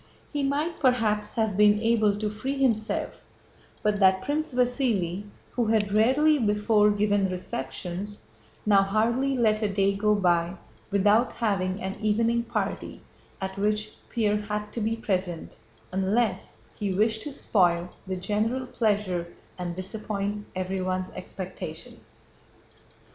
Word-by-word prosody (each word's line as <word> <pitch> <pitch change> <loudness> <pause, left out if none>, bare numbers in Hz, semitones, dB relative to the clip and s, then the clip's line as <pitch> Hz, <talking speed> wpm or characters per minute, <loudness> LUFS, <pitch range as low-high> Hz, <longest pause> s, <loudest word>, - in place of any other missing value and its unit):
He 290 - 0
might 290 +5 -1
perhaps 225 -6 +1
have 220 -4 +1
been 210 +1 +5
able 220 -2 +2
to 210 0 -1
free 260 +7 -3
himself 230 -5 0 0.6
but 210 -1 +1
that 190 -1 +4
Prince 310 +2 -1
Vasíli 245 -7 0 0.3
(who 240 -2 0
had 215 -2 +2
rarely 270 +8 +4
before 210 -1 +3
given 205 -1 +2
receptions) 185 +3 -5 0.4
now 200 -2 +6
hardly 235 +7 +1
let 215 -2 +2
a 210 -2 0
day 195 0 +2
go 210 +1 +2
by 175 -2 +2 0.3
without 210 +4 +3
having 195 -4 0
an 190 0 -3
evening 230 +2 +2
party 235 - -3 0.4
at 190 0 -4
which 210 +1 0 0.2
Pierre 210 -3 +1
had 210 0 -4
to 235 - -3
be 220 +2 0
present 185 -6 -3 0.3
unless 195 +2 0
he 205 -2 -2
wished 220 +3 +1
to 295 - -5
spoil 175 -9 +2 0.2
the 190 - -2
general 215 +7 -1
pleasure 205 -8 0 0.3
and 175 -1 -3
disappoint 205 +1 -4
everyone's 185 0 -2
expectation. 185 0 -8
210 Hz, 130 wpm, -27 LUFS, 190-225 Hz, 0.6 s, now